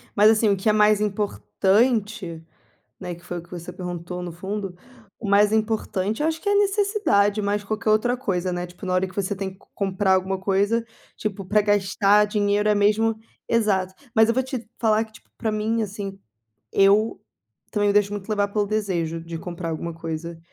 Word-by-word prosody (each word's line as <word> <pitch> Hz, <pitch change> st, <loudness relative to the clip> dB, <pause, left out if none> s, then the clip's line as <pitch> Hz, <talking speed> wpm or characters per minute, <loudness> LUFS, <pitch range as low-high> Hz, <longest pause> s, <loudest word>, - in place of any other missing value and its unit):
Mas 210 Hz, +1 st, +7 dB
assim, 220 Hz, -1 st, +3 dB
o 200 Hz, -, +3 dB
que 190 Hz, +3 st, +1 dB
é -, -, +4 dB
mais 210 Hz, 0 st, +4 dB
importante, 205 Hz, -2 st, 0 dB, 0.6 s
né. 175 Hz, -1 st, -5 dB
Que 170 Hz, +1 st, -18 dB
foi 175 Hz, -1 st, -4 dB
o -, -, -11 dB
que 170 Hz, -, -21 dB
você 175 Hz, -1 st, -7 dB
perguntou 180 Hz, 0 st, -5 dB
no 175 Hz, -1 st, -5 dB
fundo. 195 Hz, +2 st, -5 dB, 0.4 s
O 220 Hz, -, -5 dB
mais 205 Hz, +1 st, +5 dB
importante, 220 Hz, 0 st, 0 dB
eu 305 Hz, -, +2 dB
acho 320 Hz, 0 st, -2 dB
que -, -, -7 dB
é 405 Hz, -, +4 dB
a -, -, +3 dB
necessidade, 400 Hz, -, +2 dB
mais 205 Hz, 0 st, 0 dB
que 200 Hz, -, -17 dB
qualquer 215 Hz, +1 st, -1 dB
outra 220 Hz, +3 st, +3 dB
coisa, 185 Hz, -8 st, -1 dB
né. 175 Hz, 0 st, -3 dB
Tipo 180 Hz, +3 st, -11 dB
na 185 Hz, -, -1 dB
hora 185 Hz, +1 st, +2 dB
que 185 Hz, -, -14 dB
você 200 Hz, 0 st, -1 dB
tem 195 Hz, 0 st, -4 dB
que 190 Hz, -, -22 dB, 0.2 s
comprar 195 Hz, -1 st, +1 dB
alguma 190 Hz, +1 st, +1 dB
coisa, 200 Hz, +4 st, +1 dB, 0.3 s
tipo 205 Hz, -2 st, -3 dB
pra 210 Hz, +3 st, +3 dB
gastar 205 Hz, 0 st, +3 dB
dinheiro 205 Hz, 0 st, +1 dB
é 210 Hz, -, +4 dB
mesmo 215 Hz, +2 st, +3 dB, 0.3 s
exato. 195 Hz, -5 st, +1 dB, 0.2 s
Mas 220 Hz, 0 st, +6 dB
eu -, -, +3 dB
vou 260 Hz, -, +2 dB
te 255 Hz, -3 st, -5 dB
falar 220 Hz, -1 st, +3 dB
que 220 Hz, -, -22 dB
tipo -, -, -18 dB
para 225 Hz, -1 st, -1 dB
mim, 220 Hz, +2 st, 0 dB
assim, 200 Hz, -2 st, -5 dB, 0.5 s
eu 200 Hz, +3 st, +4 dB, 0.5 s
também 205 Hz, -2 st, +1 dB
me -, -, +3 dB
deixo 205 Hz, 0 st, +3 dB
muito 205 Hz, -1 st, -6 dB
levar 205 Hz, -2 st, +1 dB
pelo 205 Hz, 0 st, 0 dB
desejo 185 Hz, -6 st, -1 dB
de 165 Hz, 0 st, -6 dB
comprar 170 Hz, 0 st, -5 dB
alguma 165 Hz, +1 st, -4 dB
coisa. 165 Hz, 0 st, -5 dB
205 Hz, 205 wpm, -24 LUFS, 185-215 Hz, 0.6 s, Mas